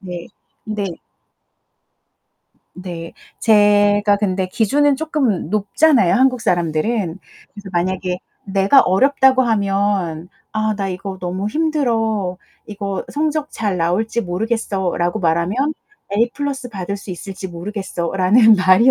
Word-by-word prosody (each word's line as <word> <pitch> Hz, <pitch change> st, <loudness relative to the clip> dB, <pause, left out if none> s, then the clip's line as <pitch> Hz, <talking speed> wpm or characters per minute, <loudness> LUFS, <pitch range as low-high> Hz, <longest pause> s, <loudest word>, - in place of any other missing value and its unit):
네. 180 Hz, -3 st, -7 dB, 0.4 s
근데 210 Hz, -2 st, -3 dB, 1.9 s
네. 175 Hz, -2 st, -7 dB, 0.3 s
제가 205 Hz, -1 st, +4 dB
근데 190 Hz, -2 st, -1 dB
기준은 275 Hz, +8 st, +2 dB
쪼끔 270 Hz, -, -1 dB
높잖아요 215 Hz, -, +3 dB
한국 255 Hz, -1 st, +3 dB
사람들은. 175 Hz, +2 st, 0 dB, 0.3 s
그래서 205 Hz, -2 st, -10 dB
만약에 180 Hz, +1 st, -1 dB, 0.3 s
내가 195 Hz, +6 st, +4 dB
어렵다고 265 Hz, +5 st, +3 dB
하면 195 Hz, -6 st, 0 dB, 0.2 s
"아 215 Hz, 0 st, 0 dB
나 195 Hz, -1 st, -2 dB
이거 190 Hz, +1 st, -6 dB
너무 185 Hz, +3 st, -3 dB
힘들어. 225 Hz, -, 0 dB, 0.3 s
이거 200 Hz, -2 st, -4 dB
성적 305 Hz, 0 st, -1 dB
잘 205 Hz, -4 st, -2 dB
나올지 195 Hz, +8 st, 0 dB
모르겠어."라고 190 Hz, -1 st, -2 dB
말하면 185 Hz, -, 0 dB, 0.4 s
"A 235 Hz, +2 st, +2 dB
플러스 280 Hz, -3 st, -4 dB
받을 200 Hz, -2 st, -5 dB
수 200 Hz, -1 st, -10 dB
있을지 190 Hz, +2 st, -7 dB
모르겠어."라는 190 Hz, +3 st, +2 dB
말이 185 Hz, +5 st, +4 dB
205 Hz, 255 characters per minute, -19 LUFS, 185-230 Hz, 1.9 s, 제가